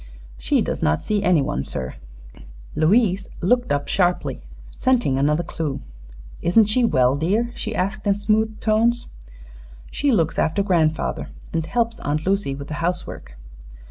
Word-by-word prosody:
"She - - +1
does - - -3
not 75 +1 +2
see 210 -1 -1
anyone, 145 - +1
sir." 65 -2 -3 0.8
Louise 195 +3 +2
looked 245 +5 +1
up 145 0 0
sharply, 180 -2 0 0.3
scenting 245 - +1
another 150 +4 +2
clue. 150 -4 -4 0.6
"Isn't 210 +6 +4
she 220 +4 +1
well, 130 - +3
dear?" 205 +11 0
she 220 -2 -5
asked 200 +3 -2
in 200 0 +3
smooth 215 +1 0
tones. 230 +2 +1 0.8
"She 285 -1 +1
looks 165 -9 +1
after 165 +6 +1
grandfather, 165 -5 0 0.2
and 165 -1 0
helps 235 -1 -1
Aunt 150 +2 -2
Lucy 195 -8 0
with 140 0 -8
the - - -5
housework." 165 - -3
180 Hz, 140 wpm, -22 LUFS, 150-220 Hz, 0.8 s, Isn't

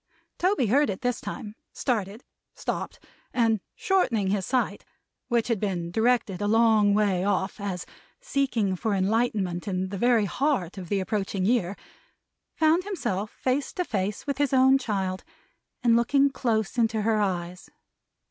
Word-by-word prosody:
Toby 370 -7 +2
heard 270 +5 +3
it 190 - -4
this 245 -2 -1
time; 215 -5 -6 0.2
started; 215 -2 -2 0.3
stopped; - - -4 0.4
and 225 -3 +3 0.2
shortening 260 - +1
his 195 -2 -1
sight, 255 -1 0 0.4
which 235 -3 +1
had 230 -4 0
been 180 -4 -2
directed 220 -2 +1
a 205 - 0
long 220 -2 +4
way 200 -4 +2
off 195 +1 -1
as 195 -3 -4 0.3
seeking 270 - 0
for 210 +2 -1
enlightenment 195 -3 0
in 185 -1 -1
the 195 -1 -5
very 235 -2 +3
heart 200 - -1
of 180 -3 -8
the 200 - +1
approaching 195 -1 -2
year, 205 -4 +1 0.8
found 320 +3 +3
himself 215 - -3
face 265 +5 -1
to 360 - -2
face 205 - -2
with 280 -1 -3
his 285 -2 +1
own 265 +1 +5
child, 190 -6 -2 0.6
and 235 -2 +5
looking 275 +4 +3
close 230 -3 -1
into 220 -2 +1
her 220 -1 +2
eyes. 180 -2 -3
220 Hz, 150 wpm, -26 LUFS, 195-250 Hz, 0.8 s, own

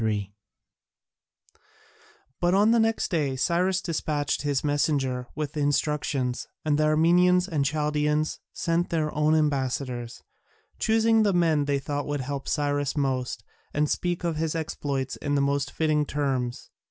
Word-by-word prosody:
[C.3] 105 -3 -1 2.1
But 175 +1 +2
on 210 +3 +5
the 235 - +4
next 225 0 +1
day 145 -6 0
Cyrus 180 +6 +1
despatched 150 -4 -1
his 145 -2 0
messenger 140 -4 0
with 150 -1 -3
the 155 - -4
instructions, 145 -3 0 0.2
and 150 -1 +2
the 155 - +3
Armenians 180 +4 +4
and 155 -6 0
Chaldaeans 150 +1 0
sent 170 +1 -1
their 155 -2 -1
own 150 +1 +2
ambassadors, 135 -5 -1 0.6
choosing 225 0 +3
the 205 -2 +3
men 160 -4 +2
they 140 0 +1
thought 145 +1 -3
would 145 -1 -2
help 140 +1 -5
Cyrus 145 -1 0
most 130 -3 -1 0.3
and 150 +1 +2
speak 175 +3 -1
of 170 -2 -1
his 160 0 -1
exploits 140 -4 -3
in 145 -1 -2
the - - +2
most 140 0 0
fitting 150 -2 0
terms. 130 -4 -2
150 Hz, 145 wpm, -26 LUFS, 140-165 Hz, 2.1 s, on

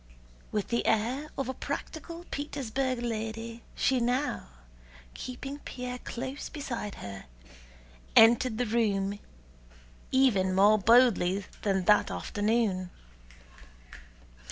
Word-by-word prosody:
With 210 -2 -2
the 235 - 0
air 245 +7 +1
of 270 - -1
a 260 - -2
practical 335 +5 -6
Petersburg 265 -3 -2
lady 225 0 -4
she 260 -1 +2
now, 250 - 0 0.7
keeping 270 +3 -6
Pierre 250 -2 -6
close 260 +4 -5
beside 240 -8 -5
her, 100 -1 -8 0.9
entered 225 0 +6
the 245 - +1
room 205 -3 0 0.9
even 200 -9 +3
more 205 +3 +6
boldly 200 -4 +4 0.2
than 190 -3 0
that 210 +1 +5
afternoon. 205 -4 0
235 Hz, 100 wpm, -29 LUFS, 210-260 Hz, 0.9 s, entered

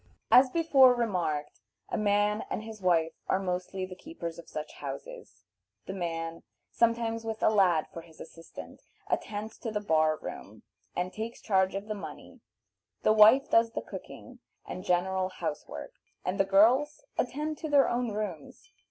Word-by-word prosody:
As 255 +1 +8
before 270 -5 +5
remarked, 175 -11 -2 0.3
a - - -2
man 210 0 +2
and 215 - -3
his 220 -2 -9
wife 165 -3 +2
are - - +2
mostly 185 0 -3
the 185 - -9
keepers 175 - -7
of 170 - -12
such 150 0 -6
houses. - - -8 0.4
The 190 - -5
man, 165 -2 -4 0.3
sometimes 230 -1 +1
with 220 -1 -4
a - - +5
lad 180 -7 +4
for 165 - -6
his 165 -1 -18
assistant, 165 0 -11 0.3
attends 215 +1 -3
to 230 - -4
the 210 -1 -2
bar 155 -5 +2
room, 105 -6 -9 0.3
and 180 +1 -2
takes 225 +2 -5
charge 190 -2 +1
of 200 +2 -4
the 215 - -2
money, 205 - -9 0.6
the 215 - +5
wife 220 +6 +6
does 230 0 +4
the - - -2
cooking - - -10 0.3
and 185 - -6
general 185 0 +1
house 185 - -5
work, - - -8 0.3
and 185 +2 -2
the 195 - +4
girls 240 - +4 0.2
attend 295 +4 -2
to 315 - -4
their 285 -2 +5
own 245 0 0
rooms. 205 -8 -6
205 Hz, 165 wpm, -29 LUFS, 180-230 Hz, 0.6 s, As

